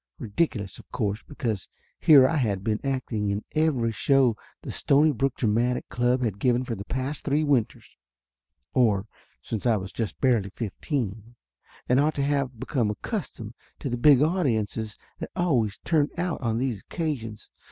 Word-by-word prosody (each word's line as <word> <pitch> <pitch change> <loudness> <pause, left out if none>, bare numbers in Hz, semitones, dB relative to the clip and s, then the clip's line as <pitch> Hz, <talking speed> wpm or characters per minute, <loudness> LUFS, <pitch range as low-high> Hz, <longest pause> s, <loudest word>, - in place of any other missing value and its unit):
Ridiculous, 105 - -2
of - - -16
course, 105 -4 -1
because 110 -7 -4 0.3
here 140 -4 +7
I 160 - 0
had 100 -8 0
been 110 0 0
acting 130 -6 -1
in 100 +1 -2
every 150 -8 +2
show 130 0 +3 0.3
the - - -5
Stonybrook 140 -2 +2
Dramatic 120 +2 0
Club 125 +1 +1
had 105 -4 -2
given 125 +1 +2
for 120 - -4
the 100 -2 -6
past 130 +4 -3
three 145 +2 +1
winters, 140 -7 -1 0.8
or 105 -6 +3 0.4
since 110 +2 -3
I 115 -2 +4
was 95 0 -6
just 115 -3 -3
barely 120 -7 +2
fifteen, 115 - -4 0.5
and 125 +2 +4
ought 150 +2 +2
to 140 - 0
have 140 -4 -1
become 120 -5 0
accustomed 115 - -5 0.2
to 140 - -4
the 120 - -1
big 140 +1 +6
audiences 115 - 0 0.2
that - - -5
always 125 - +1
turned 155 -3 +2
out 175 -3 -2
on 115 -3 0
these 120 -5 -1
occasions. 125 - -4
125 Hz, 160 wpm, -26 LUFS, 110-140 Hz, 0.8 s, here